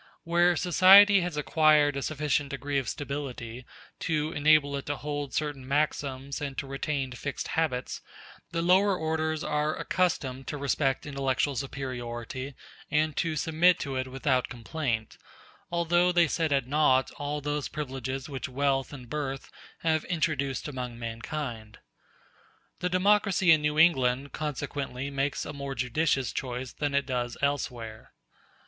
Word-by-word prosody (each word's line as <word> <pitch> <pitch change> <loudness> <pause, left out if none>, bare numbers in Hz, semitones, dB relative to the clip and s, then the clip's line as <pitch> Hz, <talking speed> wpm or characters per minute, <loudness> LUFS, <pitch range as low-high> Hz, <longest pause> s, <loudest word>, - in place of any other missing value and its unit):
Where 175 +1 +3
society 190 +4 +7
has 175 -3 -3
acquired 150 -1 +4
a 140 - -2
sufficient 145 -1 -1
degree 140 0 -1
of 130 - -4
stability 130 -4 -5 0.3
to 155 -1 -1
enable 150 -2 +4
it 140 - -5
to 145 - -1
hold 145 -1 -4
certain 145 -4 -3
maxims 140 -1 -1
and 140 -2 -4
to - - -2
retain 135 0 -3
fixed 140 +3 -5
habits, 135 -6 -1 0.5
the 165 0 -2
lower 190 +2 +4
orders 160 -1 -1
are 150 +1 0
accustomed 135 -8 -1
to 150 - -3
respect 140 -1 0
intellectual 140 0 0
superiority 130 -1 -5 0.3
and 155 0 +1
to 165 -2 0
submit 165 +3 +3
to 135 -2 -3
it 130 0 -2
without 130 0 0
complaint, 120 -2 -3 0.5
although 175 +1 +3
they 175 -1 +4
set 160 +1 -1
at 135 -3 +2
naught 130 -2 +3
all 145 +1 -3
those 145 0 -2
privileges 135 -3 -4
which 140 -2 -5
wealth 135 0 0
and 130 -4 -9
birth 135 0 -4 0.3
have 160 -1 +1
introduced 155 -7 -1
among 125 -4 -5
mankind. 115 -1 -5 1.0
The 180 - -1
democracy 190 -1 +3
in 155 -2 +6
New 150 0 0
England 135 -4 +3
consequently 140 -2 -4
makes 140 +1 -1
a 145 - -6
more 140 -1 -5
judicious 130 +2 0
choice 125 -1 -4
than 145 -1 -2
it 140 -1 +2
does 125 -2 -2
elsewhere. 120 -6 -3
145 Hz, 140 wpm, -28 LUFS, 130-155 Hz, 1.0 s, society